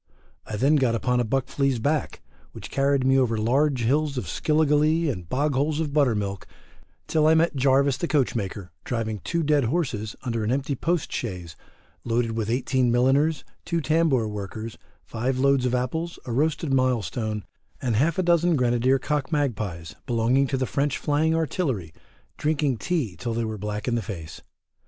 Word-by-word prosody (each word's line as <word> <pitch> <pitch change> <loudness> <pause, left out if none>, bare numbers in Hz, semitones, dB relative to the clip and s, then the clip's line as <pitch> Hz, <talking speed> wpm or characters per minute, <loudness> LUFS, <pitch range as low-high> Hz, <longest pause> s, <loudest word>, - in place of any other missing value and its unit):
I 105 - -4
then 140 +8 +3
got 125 -4 +2
upon 125 +2 +1
a - - +2
buck 130 +3 0
flea's 135 -3 0
back, 145 +6 -1 0.3
which - - -9
carried 140 -1 +2
me 135 0 +4
over 115 -4 +1
large 130 +4 +1
hills 140 +3 +1
of 125 - -2
skilligalee 155 +1 +2
and 90 -8 -8
bog 145 +3 0
holes 145 +3 0
of 150 -3 -2
buttermilk, 105 -9 0 0.6
till 155 -1 +2
I 160 - +5
met 165 0 +2
Jarvis 135 0 +3
the 170 - -2
coachmaker 105 - -1
driving 110 -3 -3
two 170 - -2
dead 145 -3 +2
horses 115 -7 -2
under 115 -3 -2
an 105 - 0
empty 140 +2 -1
post 165 +4 -1
chaise 90 -8 -5 0.5
loaded 115 0 0
with 110 -1 -2
18 125 0 +1
milliners, 135 +6 +2 0.2
2 170 - 0
tambour 155 -6 +2
workers, 105 +2 -6 0.3
5 125 +3 -2
loads 135 -1 +3
of 125 - 0
apples, 160 +7 -2
a 125 - -5
roasted 150 +3 0
milestone, 115 -4 0 0.4
and 120 -4 -1
half 150 +8 +2
a 185 - +2
dozen 170 0 +3
grenadier 125 0 +2
cock 145 +2 -2
magpies, 105 - -2
belonging 120 +3 +2
to 135 - -1
the 130 - 0
French 140 +1 -1
flying 155 +2 +1
artillery, 135 - -2 0.4
drinking 150 -4 0
tea 140 - -2
till 115 +7 -4
they 115 0 -1
were 110 0 -4
black 105 +2 -4
in 120 - +1
the 120 - +1
face. 85 -6 -8
130 Hz, 175 wpm, -25 LUFS, 115-150 Hz, 0.6 s, I